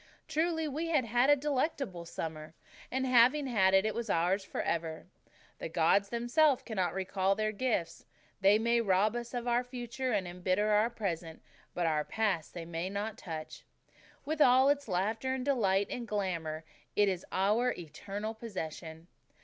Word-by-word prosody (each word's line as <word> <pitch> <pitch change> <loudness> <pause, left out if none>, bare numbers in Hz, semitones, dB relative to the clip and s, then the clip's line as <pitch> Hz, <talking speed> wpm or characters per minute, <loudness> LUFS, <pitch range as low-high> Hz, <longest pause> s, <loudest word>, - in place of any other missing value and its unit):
Truly, 320 0 0
we 305 +4 -3
had 310 -7 +2
had 245 +4 +2
a 290 - +8
delectable 275 - -2
summer; 160 -1 -6 0.3
and, 265 +1 -1
having 255 +3 +5
had 195 -7 +3
it, 195 +2 +4
it 215 - 0
was 230 0 -4
ours 185 +3 +1
forever. 160 -3 -3 0.5
"The - - -5
gods 175 +5 +3
themselves 245 +5 +2
cannot 190 -6 -2
recall 190 0 0
their 215 +1 0
gifts." 200 -7 -2 0.3
They 200 +2 +5
may 235 +1 +2
rob 205 +1 +2
us 240 +1 -5
of 245 0 -3
our 240 +1 +2
future 250 +1 -4
and 200 -5 0
embitter 185 +4 0
our 210 +2 +4
present, 170 -8 -4 0.3
but 175 - 0
our 155 -2 +1
past 195 -7 -1
they 170 -1 -5
may 170 +2 -4
not 205 +2 -3
touch. 160 -7 -7 0.6
With 310 +1 -2
all 260 +1 +6
its 285 -2 +1
laughter 220 +7 -1
and 255 -1 -4
delight 200 -8 +2
and 240 -1 -4
glamour 170 -7 -2 0.3
it 205 0 +4
is 185 -2 -1
our 210 +6 +2
eternal 195 +7 -6
possession. 165 -7 -7
210 Hz, 165 wpm, -31 LUFS, 180-245 Hz, 0.6 s, a